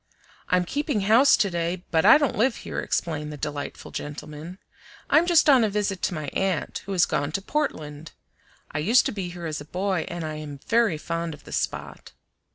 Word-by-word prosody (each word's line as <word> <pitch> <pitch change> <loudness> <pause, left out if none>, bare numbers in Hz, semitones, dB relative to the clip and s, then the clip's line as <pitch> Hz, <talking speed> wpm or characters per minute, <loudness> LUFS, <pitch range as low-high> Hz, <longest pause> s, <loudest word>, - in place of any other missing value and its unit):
"I'm 180 0 +3
keeping 285 - -1
house 225 +8 +6
to 200 -3 +1
day, 170 +1 -2
but 160 +2 +3
I 230 - +9
don't 285 -3 0
live 235 +3 +2
here," - - -3
explained 150 -3 -2
the 150 - -7
delightful 145 0 -5
gentleman. 150 +4 -7 0.5
"I'm 335 +3 +5
just 340 -3 +5
on 265 -5 +6
a 220 - +2
visit 200 -2 -1
to 175 - -1
my 155 -2 -4
aunt, 190 -4 -1
who - - -4
has 180 - +4
gone 145 +1 -1
to 195 - -1
Portland. 160 - -3 0.6
I 145 - -2
used 225 +11 +4
to - - 0
be 195 -4 -4
here 175 -1 -8
as 155 -2 -3
a - - -6
boy 185 +1 -1
and 175 -1 -5
I 155 -1 -4
am 150 -2 -7
very 230 -8 +2
fond 165 0 -3
of - - -20
the - - -12
spot." - - -4
175 Hz, 205 wpm, -25 LUFS, 155-215 Hz, 0.6 s, I